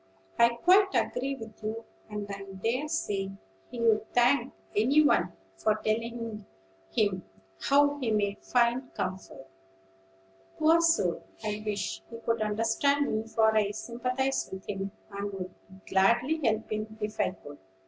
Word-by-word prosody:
"I 235 0 +7
quite 380 +8 +4
agree 270 +2 0
with 225 -4 -11
you; 220 +2 -4 0.2
and 210 -1 -4
I 200 -1 -6 0.2
dare 255 +6 0
say 205 -11 -1 0.4
he'd 225 -3 +1
thank 245 +3 +4 0.2
any 270 +9 +5
one - - +3 0.3
for 215 - +2
telling 225 0 -3 0.5
him 190 - +1 0.4
how 285 +1 +3
he 250 -4 -1
may 205 -2 +1
find 245 +1 +1
comfort. 185 -7 -5 1.1
Poor 325 +2 +5
soul! 265 - +2 0.2
I 210 0 -2
wish 200 - -3
he 230 - -7
could 230 -1 -1
understand 225 +7 +1
me; 220 +1 -2
for 220 -1 +3
I 210 -2 +3
sympathize 250 +5 -2
with 190 0 -8
him, 195 -1 -3 0.2
and 200 0 -4
would 185 -1 -5 0.4
gladly 240 +11 +3
help 220 -2 0
him 215 0 -4
if 210 0 -4
I - - +3
could." 145 -6 -12
220 Hz, 140 wpm, -29 LUFS, 205-250 Hz, 1.1 s, I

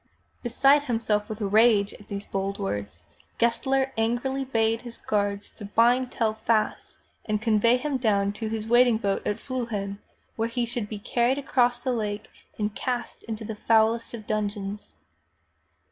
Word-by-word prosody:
Beside 275 +4 +4
himself 225 -4 0
with 215 0 -6
rage 210 0 +4
at 210 - -14
these 200 0 -5
bold 195 0 -3
words, 100 - -4 0.3
Gessler 265 +3 +1
angrily 240 +4 0
bade 225 -3 +1
his 240 -1 -9
guards 205 -1 -1
to 210 - -10
bind 240 +5 +3
Tell 225 -3 0
fast 220 0 -1 0.3
and 210 -1 0
convey 225 +2 +3
him 280 +1 -1
down 200 -4 +1
to 220 +1 -4
his 220 -1 -3
waiting 240 0 +5
boat 200 -3 -1
at 210 - 0
Fliihlen, 220 -6 -4 0.4
whence 230 +1 -2
he 245 -1 +1
should 235 -3 -4
be 215 - -5
carried 240 +5 +1
across 245 -4 +2
the 255 0 -1
lake 210 -2 -3 0.3
and 210 -1 -1
cast 245 0 -3
into 220 -1 -5
the 220 - -4
foulest 225 +2 +2
of 215 -2 -9
dungeons. 205 -1 -3
225 Hz, 160 wpm, -26 LUFS, 210-240 Hz, 0.4 s, waiting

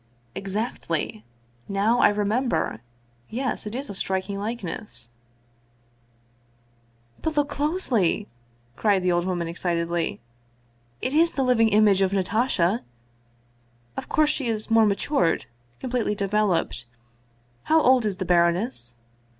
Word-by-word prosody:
" 120 -1 -37
Exactly. 190 - -2 0.5
Now 205 +5 +2
I - - +6
remember! 205 - 0 0.5
Yes, 250 -2 -2
it 210 - -5
is 275 +2 -2
a - - -6
striking 190 +1 -2
likeness." 210 - -5 1.2
" 120 0 -35
But 315 -1 -2
look 290 -1 +2
closely," 275 - 0 0.5
cried 200 - +2
the 180 - +2
old 175 0 +1
woman 175 -2 -1
excitedly; 170 0 -1 0.4
" 120 0 -38
it 260 - -1
is 330 +2 +4
the 270 - 0
living 235 -3 +4
image 205 -2 +4
of 190 0 +2
Natasha! 200 0 +1 1.1
Of - - -6
course 305 -1 +3
she 270 -5 -2
is 220 0 -3
more 225 -1 +6
matured, 200 - +1 0.3
completely 245 -4 -1
developed. 200 -2 0 0.8
How 320 +1 +4
old 260 -4 +4
is 205 -3 -1
the 185 - -3
baroness 170 - +1
200 Hz, 125 wpm, -25 LUFS, 170-235 Hz, 1.2 s, I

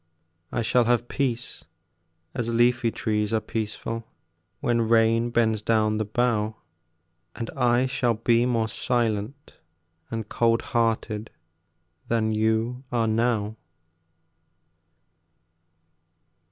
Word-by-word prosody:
I 120 - -1
shall 120 +2 +3
have 120 0 +2
peace, 125 -3 -3 0.7
as 120 -3 -2
leafy 120 0 +3
trees 105 -1 -1
are 110 - +2
peaceful 110 +1 -4 0.5
When 120 -1 +1
rain 115 +1 +3
bends 110 -2 +1
down 110 -1 +1
the 110 - 0
bough, 110 -1 0 0.8
And 115 - -5
I 125 -1 +2
shall 125 -2 0
be 115 +2 +2
more 115 -3 +1
silent 120 +2 -2 0.5
and 115 -2 -4
cold 115 +1 +2
hearted 115 -2 0 0.8
Than 110 -1 +1
you 110 +3 0
are 120 -2 +1
now. 110 -1 0
115 Hz, 100 wpm, -25 LUFS, 110-120 Hz, 0.8 s, shall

